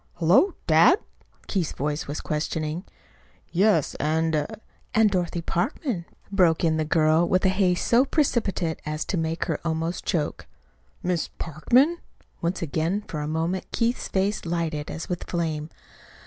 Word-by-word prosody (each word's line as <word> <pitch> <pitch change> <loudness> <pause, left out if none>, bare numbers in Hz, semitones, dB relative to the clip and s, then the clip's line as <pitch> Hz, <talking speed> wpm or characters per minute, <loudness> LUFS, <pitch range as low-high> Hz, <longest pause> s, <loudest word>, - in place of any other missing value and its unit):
"Hullo! 180 - +4
Dad?" 165 - +6 0.5
Keith's 180 -6 -1
voice 150 +2 -2
was 145 +2 -4
questioning. 155 +3 -2 0.7
"Yes; 185 -4 +3
and 155 0 +1 0.2
" - - -19
"And 220 -2 +5
Dorothy 175 -2 -1
Parkman," 180 - -2 0.3
broke 180 -5 +3
in 160 -1 +3
the 155 - 0
girl 160 +1 +3
with 185 +1 +2
a - - +6
haste 185 -2 +1
so 240 +2 +5
precipitate 220 - 0
as 155 +1 -3
to - - -2
make 160 0 -1
her - - -2
almost 165 +1 -2
choke. 155 -4 -2 0.6
"Miss 175 -2 0
Parkman?" 250 - +2 0.4
Once 170 +1 -1
again, 165 +6 -1
for 155 - -4
a 150 - -3
moment, 165 +4 -2
Keith's 235 +1 0
face 195 +2 0
lighted 165 -3 -2
as 165 - -5
with 180 -1 -3
a - - -22
flame. 160 -3 -2
170 Hz, 150 wpm, -25 LUFS, 155-190 Hz, 0.7 s, Dad